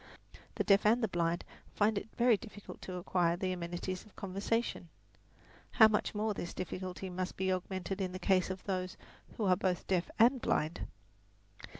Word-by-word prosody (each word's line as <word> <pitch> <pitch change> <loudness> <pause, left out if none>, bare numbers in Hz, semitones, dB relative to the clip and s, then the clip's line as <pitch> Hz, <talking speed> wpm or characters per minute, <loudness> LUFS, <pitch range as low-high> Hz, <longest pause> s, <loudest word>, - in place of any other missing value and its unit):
The - - 0
deaf 200 -1 +5
and 230 +3 +4
the - - +3
blind 170 -2 0 0.3
find 215 +1 +3
it 200 +2 -3
very 240 -1 +5
difficult 205 -1 -10
to 185 - -6
acquire 175 -1 +1
the 185 0 -1
amenities 180 +1 -4
of 215 - -20
conversation. 195 -1 -2 0.8
How 220 - +9
much 215 0 0
more 215 +1 0
this 175 - -5
difficulty 185 +1 -4
must 185 0 -4
be 190 0 +1
augmented 190 +1 -3
in 185 -1 -1
the 185 - -5
case 185 0 +2
of 185 0 -5
those 185 -2 -3 0.4
who 220 - 0
are 185 -1 +5
both 180 -2 -1
deaf 185 -2 0
and 245 +3 +5
blind! 155 +3 0
190 Hz, 175 wpm, -33 LUFS, 180-210 Hz, 0.8 s, How